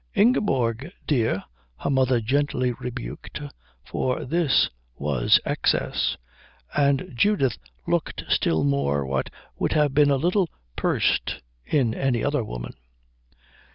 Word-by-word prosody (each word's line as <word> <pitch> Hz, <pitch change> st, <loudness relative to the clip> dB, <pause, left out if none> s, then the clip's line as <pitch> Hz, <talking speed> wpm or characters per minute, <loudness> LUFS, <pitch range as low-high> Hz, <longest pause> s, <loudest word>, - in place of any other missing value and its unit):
"Ingeborg 135 Hz, -, +2 dB
dear," 115 Hz, -9 st, +1 dB, 0.3 s
her -, -, -3 dB
mother 130 Hz, -2 st, +3 dB
gently 130 Hz, +1 st, +1 dB
rebuked, 125 Hz, +3 st, -6 dB, 0.5 s
for 130 Hz, -1 st, -2 dB
this 155 Hz, 0 st, +2 dB, 0.2 s
was 70 Hz, -4 st, +3 dB
excess; -, -, 0 dB, 0.6 s
and 140 Hz, -1 st, +2 dB
Judith 135 Hz, -, +2 dB, 0.3 s
looked -, -, -1 dB
still 80 Hz, -2 st, +2 dB
more 70 Hz, 0 st, +1 dB
what 65 Hz, 0 st, -1 dB, 0.3 s
would -, -, +1 dB
have 150 Hz, -3 st, +2 dB
been 145 Hz, 0 st, +5 dB
a 140 Hz, -, +4 dB
little 175 Hz, +5 st, +1 dB, 0.3 s
pursed -, -, 0 dB, 0.2 s
in 130 Hz, -7 st, +2 dB
any 125 Hz, -2 st, 0 dB
other 145 Hz, -3 st, +1 dB
woman. -, -, -6 dB
130 Hz, 115 wpm, -25 LUFS, 110-145 Hz, 0.6 s, been